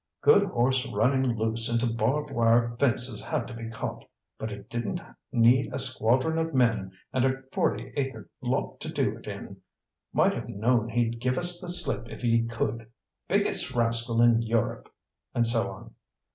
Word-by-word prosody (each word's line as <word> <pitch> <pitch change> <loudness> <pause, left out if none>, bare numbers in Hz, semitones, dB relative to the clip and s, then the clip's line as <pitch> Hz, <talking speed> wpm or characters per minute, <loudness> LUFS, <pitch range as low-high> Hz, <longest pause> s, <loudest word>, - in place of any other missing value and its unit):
"Good - - +6
horse 130 +2 +1
running 130 0 +1
loose 115 +1 0
into 115 0 +1
barb 135 +7 0
wire 115 -1 +3
fences 120 -4 +1
had 145 -7 -2
to 125 - -8
be 115 0 -6
caught, 115 - -5 0.4
but 110 - -4
it 100 0 -9
didn't 120 -1 -3 0.3
need 120 +3 +4
a - - -3
squadron 130 +4 +2
of 160 -2 -2
men 115 -7 +2 0.2
and 130 - +2
a 135 0 0
forty 120 +4 -1
acre 130 -7 -3
lot - - -2
to - - -5
do - - 0
it - - -14
in. - - -8 0.5
Might - - +3
have - - -6
known 115 +2 +1
he'd 115 0 0
give 125 +1 0
us 175 0 +1
the 180 - -7
slip 140 -9 0
if - - -9
he 115 -1 +2
could 115 -1 -3 0.4
biggest 130 - +1
rascal 115 0 +2
in 115 -1 +5
Europe!" 115 -1 -1 0.4
And 120 - +3
so 115 -4 +2
on. 95 - -11
120 Hz, 170 wpm, -27 LUFS, 115-130 Hz, 0.5 s, Good